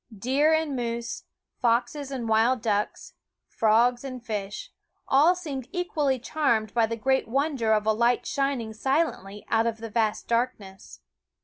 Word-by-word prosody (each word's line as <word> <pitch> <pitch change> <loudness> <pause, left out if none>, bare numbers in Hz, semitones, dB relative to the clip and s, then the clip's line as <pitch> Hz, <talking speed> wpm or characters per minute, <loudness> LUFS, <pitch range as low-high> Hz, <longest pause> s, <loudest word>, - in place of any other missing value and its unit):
Deer 270 +9 +2
and 315 -3 +1
moose, 235 -1 -4 0.4
foxes 245 +4 0
and 255 -4 -4
wild 225 +3 +3
ducks, 210 -2 -2 0.3
frogs 235 +3 +2
and 255 -3 -7
fish, 205 -3 -5 0.4
all 305 +7 +5
seemed 285 -8 -6
equally 305 -7 0
charmed 235 -5 0
by 230 -2 +3
the 230 - -3
great 265 +3 +1
wonder 270 -2 0
of 215 -1 +2
a 220 - +3
light 235 +2 +1
shining 275 -5 -1
silently 220 - -1
out 225 +1 +2
of 230 -1 -2
the 225 0 -8
vast 220 -1 0
darkness. 230 -5 -3
240 Hz, 145 wpm, -26 LUFS, 220-275 Hz, 0.4 s, all